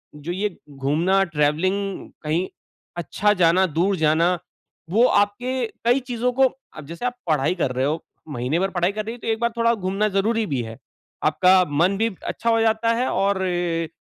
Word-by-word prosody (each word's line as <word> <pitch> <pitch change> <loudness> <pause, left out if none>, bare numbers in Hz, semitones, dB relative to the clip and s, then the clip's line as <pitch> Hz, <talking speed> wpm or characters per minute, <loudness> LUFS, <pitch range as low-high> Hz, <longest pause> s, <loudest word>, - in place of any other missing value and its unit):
जो 150 +3 -6
ये 200 +4 -1 0.2
घूमना 155 +8 +1
ट्रैवलिंग 185 +5 -1
कहीं 160 +5 0 0.5
अच्छा 180 +5 +1
जाना, 180 0 +4
दूर 175 +5 +1
जाना, 165 +3 +2 0.5
वो 215 +7 +3
आपके 245 +5 +1 0.2
कई 245 +3 +4
चीज़ों 250 -1 -2
को 265 +2 +3 0.3
अब 155 - -8
जैसे 170 +8 -6
आप 250 0 -1
पढ़ाई 155 +3 +2
कर 160 -7 -1
रहे 130 +1 0
हो, 155 +3 -1 0.3
महीने 130 +4 -1
भर 195 +1 0
पढ़ाई 175 0 +1
कर 215 0 -4
रही 225 +2 -5
हो - - -15
तो - - -5
एक 225 -1 0
बार 235 - +2
थोड़ा 230 0 +3
घूमना 195 +1 -1
ज़रूरी 215 +3 +1
भी 135 -5 -1
है। 115 0 -8 0.5
आपका 185 0 +5 0.2
मन 190 +3 +3
भी 225 +2 +1 0.2
अच्छा 230 - -2
हो 225 0 +3
जाता 225 +1 +2
है 245 +3 0
और 195 -1 +1
अ, 175 -3 -1
190 Hz, 190 wpm, -22 LUFS, 165-220 Hz, 0.5 s, आपका